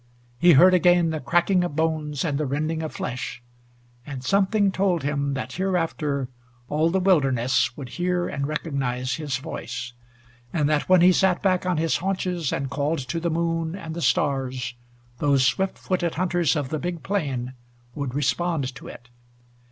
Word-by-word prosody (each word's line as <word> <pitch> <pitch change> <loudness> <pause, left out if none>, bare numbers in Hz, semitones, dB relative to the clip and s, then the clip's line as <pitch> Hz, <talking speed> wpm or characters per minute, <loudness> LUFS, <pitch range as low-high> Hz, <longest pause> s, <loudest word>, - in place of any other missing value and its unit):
He 175 -1 +7
heard 180 +6 +7
again 175 -2 +4
the 155 - -2
cracking 175 +6 +2
of 175 -5 -3
bones 155 -2 -1
and 145 -3 -1
the 150 - -1
rending 155 +4 -1
of 155 - -4
flesh, 125 0 -5 0.6
and 135 -2 -7
something 200 +5 +2
told 185 -4 +1
him 140 -1 -1
that 130 -1 -5
hereafter 165 -7 -1 0.4
all 155 +2 +2
the 190 +3 +1
wilderness 130 -9 +2
would 140 -3 -6
hear 175 +4 -1
and 140 0 -3
recognize 130 -5 -2
his 145 -5 -2
voice, 125 -4 -6 0.6
and 150 -4 +1
that 150 +2 0
when 185 -2 +6
he 180 +1 +7
sat 185 +1 +2
back 185 -2 +1
on 180 -3 +1
his 160 0 +1
haunches 180 -4 -2
and 135 0 -2
called 145 +3 0
to 170 - -1
the 170 +1 -1
moon 165 0 -1
and 165 -5 -7
the 170 - -4
stars, 130 -2 0 0.5
those 140 -3 +3
swift 190 +8 0
footed 175 -3 -1
hunters 175 -5 +1
of 145 -3 -2
the 155 - -2
big 175 0 -4
plain 135 -11 -2 0.4
would 140 -2 -4
respond 145 -1 0
to - - -11
it. 120 - -11
155 Hz, 170 wpm, -24 LUFS, 135-175 Hz, 0.6 s, He